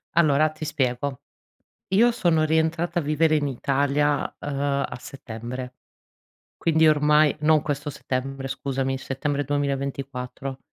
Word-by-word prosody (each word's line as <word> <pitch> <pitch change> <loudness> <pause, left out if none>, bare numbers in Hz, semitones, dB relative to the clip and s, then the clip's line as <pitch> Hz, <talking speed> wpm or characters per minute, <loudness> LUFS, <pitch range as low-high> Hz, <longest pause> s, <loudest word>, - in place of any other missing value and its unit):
Allora 155 -2 +4
ti 155 0 -9
spiego. 135 -3 -1 0.7
Io 230 +5 +5
sono 165 -8 +2
rientrata 160 +2 +1
a - - -1
vivere 155 +2 +2
in 145 -1 +1
Italia, 140 +2 +1
ehm, 145 - -5 0.4
a - - -6
settembre, 125 -1 -7 0.8
quindi 160 -1 +3
ormai 150 0 +4
non 155 -1 +4
questo 145 0 -3
settembre 135 0 -4
scusami, 135 0 -2
settembre 140 +2 -2
2024. 140 -2 -3
145 Hz, 120 wpm, -24 LUFS, 135-155 Hz, 0.8 s, Io